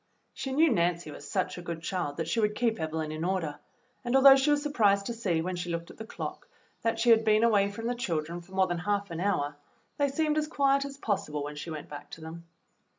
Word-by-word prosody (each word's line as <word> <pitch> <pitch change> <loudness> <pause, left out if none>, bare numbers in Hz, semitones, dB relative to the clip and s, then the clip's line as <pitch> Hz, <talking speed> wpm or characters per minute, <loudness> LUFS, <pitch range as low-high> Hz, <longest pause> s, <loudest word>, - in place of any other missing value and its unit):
She 270 - -5
knew 310 +3 +4
Nancy 170 -5 0
was 145 0 -10
such 185 -2 -1
a - - -7
good 170 -2 -6
child 170 -5 -2
that 165 -1 -2
she 230 - 0
would 210 -1 +1
keep 230 -3 0
Evelyn 160 -1 -3
in 155 +1 -4
order, 175 -5 -1 0.4
and 240 +1 0
although 270 0 +9
she 270 +2 +2
was 290 0 +2
surprised 205 -9 +2
to 235 - -3
see, 185 -8 -1
when 185 +1 -3
she 175 0 -4
looked 170 0 -4
at - - -16
the 220 - -8
clock, - - -6 0.3
that 230 0 0
she 235 +1 +4
had 225 0 +6
been 215 0 +4
away 205 -4 +4
from 225 +3 -7
the 245 - 0
children 170 -7 -3
for 185 +2 -17
more 190 0 +3
than 175 -2 -2
half 200 +1 -1
an 165 - -4
hour, 150 -7 0 0.4
they 285 -1 +3
seemed 305 +2 +1
as 305 - -2
quiet 275 -2 +2
as 275 -1 -8
possible 155 - -2
when 150 +1 -6
she 150 +3 -6
went 155 -2 -6
back 145 0 -9
to 165 - -10
them. 165 +1 -9
195 Hz, 250 wpm, -29 LUFS, 165-235 Hz, 0.4 s, although